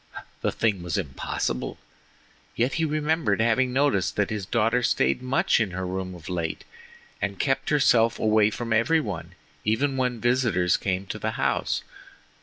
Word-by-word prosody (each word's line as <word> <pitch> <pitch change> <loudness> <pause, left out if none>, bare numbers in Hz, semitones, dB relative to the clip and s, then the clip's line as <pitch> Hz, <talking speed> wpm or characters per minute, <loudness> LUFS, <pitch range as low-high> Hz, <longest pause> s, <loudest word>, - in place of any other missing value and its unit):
—the - - +1
thing 105 -5 0
was 85 +1 -2
impossible. 65 -5 -3 0.8
Yet 120 +3 +1
he - - +3
remembered 155 -8 0
having 115 +3 +2
noticed 130 -8 +1
that 105 0 0
his 105 -4 -3
daughter 115 +2 +2
stayed 70 - +1
much 130 -1 +2
in 110 -4 +1
her 95 - -2
room 95 0 -4
of 85 - -12
late 85 -3 -3 0.6
and 100 0 -2
kept 135 -1 0
herself 120 -6 +4
away 110 -1 +3
from 115 +1 -3
every 115 +9 +3
one, 100 - -5 0.3
even 135 +6 +1
when 125 -2 0
visitors 120 -8 +2
came 95 0 -2
to 105 - -6
the 110 +1 -2
house. - - 0
110 Hz, 160 wpm, -25 LUFS, 95-125 Hz, 0.8 s, herself